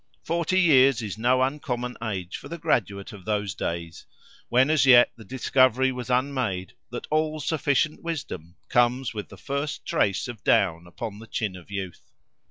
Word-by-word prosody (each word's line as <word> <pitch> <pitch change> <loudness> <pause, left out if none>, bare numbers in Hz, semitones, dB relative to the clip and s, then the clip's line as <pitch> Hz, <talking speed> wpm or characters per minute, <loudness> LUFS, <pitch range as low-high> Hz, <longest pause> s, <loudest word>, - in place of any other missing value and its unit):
Forty 170 +2 +1
years 135 -8 +5
is 105 0 -5
no 125 +2 +3
uncommon 125 -3 -2
age 95 -5 -4
for - - -11
the 170 - -5
graduate 100 - -1
of 100 -3 -11
those 105 -1 -1
days, 85 0 -5 0.4
when 130 +5 +4
as 155 -3 +3
yet 120 -2 +8
the 115 - -13
discovery 130 +2 +2
was 125 -1 -6
unmade, 125 -8 -1 0.2
that - - -6
all 155 0 +1
sufficient 150 0 0
wisdom 145 - -5
comes 120 - +2
with 105 -2 -6
the 100 - -12
first 140 - -4
trace 100 +3 +1
of 120 -4 -8
down 85 -3 +2
upon 105 +4 -7
the 115 - -11
chin 105 -4 -2
of 90 0 -13
youth. 95 -3 -6
120 Hz, 170 wpm, -25 LUFS, 100-135 Hz, 0.4 s, yet